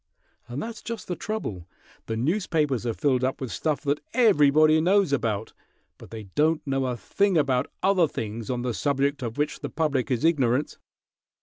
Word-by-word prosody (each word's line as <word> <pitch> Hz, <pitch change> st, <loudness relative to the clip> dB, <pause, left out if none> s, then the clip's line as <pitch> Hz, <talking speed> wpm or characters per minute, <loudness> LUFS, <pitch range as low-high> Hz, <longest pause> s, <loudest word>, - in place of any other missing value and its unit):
And 125 Hz, +4 st, -4 dB
that's 225 Hz, -1 st, -7 dB
just 230 Hz, -2 st, -6 dB
the 180 Hz, -, -2 dB
trouble. 110 Hz, -, -5 dB, 0.4 s
The 110 Hz, -, -2 dB
newspapers 150 Hz, -, 0 dB
are 115 Hz, -, 0 dB
filled 130 Hz, -4 st, +1 dB
up 130 Hz, +1 st, -1 dB
with 130 Hz, -3 st, -5 dB
stuff 155 Hz, -3 st, -1 dB
that 145 Hz, -1 st, 0 dB, 0.2 s
everybody 155 Hz, -, +5 dB
knows 185 Hz, -2 st, +3 dB
about, 110 Hz, -5 st, -1 dB, 0.5 s
but -, -, -12 dB
they 110 Hz, -1 st, -7 dB
don't 155 Hz, +1 st, +2 dB
know 135 Hz, -1 st, 0 dB
a 125 Hz, -1 st, -2 dB
thing 200 Hz, -, +1 dB
about 135 Hz, -3 st, +1 dB
other 190 Hz, -4 st, +4 dB
things 110 Hz, -3 st, -5 dB
on 125 Hz, -1 st, -2 dB
the 125 Hz, -1 st, -1 dB
subject 140 Hz, +2 st, 0 dB
of 115 Hz, 0 st, -4 dB
which 150 Hz, +1 st, -1 dB
the -, -, -5 dB
public 145 Hz, -5 st, -1 dB
is 125 Hz, +2 st, 0 dB
ignorant." 140 Hz, -4 st, +1 dB
140 Hz, 180 wpm, -25 LUFS, 125-165 Hz, 0.5 s, everybody